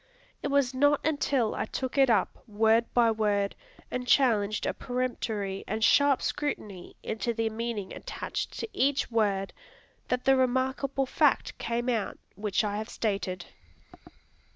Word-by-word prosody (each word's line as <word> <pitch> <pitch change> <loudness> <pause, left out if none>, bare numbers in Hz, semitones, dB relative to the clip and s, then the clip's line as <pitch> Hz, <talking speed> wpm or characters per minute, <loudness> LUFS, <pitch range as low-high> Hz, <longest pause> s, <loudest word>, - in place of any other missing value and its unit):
It - - -2
was 280 -2 +2
not 290 +2 +3
until 280 -6 +1
I - - -2
took 260 +3 -4
it 270 -2 +5
up, 215 -5 +1
word 220 +2 +2
by 235 -2 +4
word, 205 -2 0 0.4
and 250 0 -3
challenged 215 -6 +3
a - - 0
peremptory 225 -6 -3
and 220 +1 -2
sharp 285 +3 +4
scrutiny 210 -11 -4
into 225 +2 -2
the 225 -1 0
meaning 220 -3 -4
attached - - -5
to - - -3
each 275 -1 +1
word, 200 -4 +1 0.5
that 250 0 -1
the 270 0 +6
remarkable 260 +1 +1
fact - - +2
came 235 +1 -2
out 230 -5 -1 0.2
which 205 +1 0
I 205 -1 -1
have 215 +1 -5
stated. 195 -5 -2
230 Hz, 145 wpm, -28 LUFS, 210-260 Hz, 0.5 s, the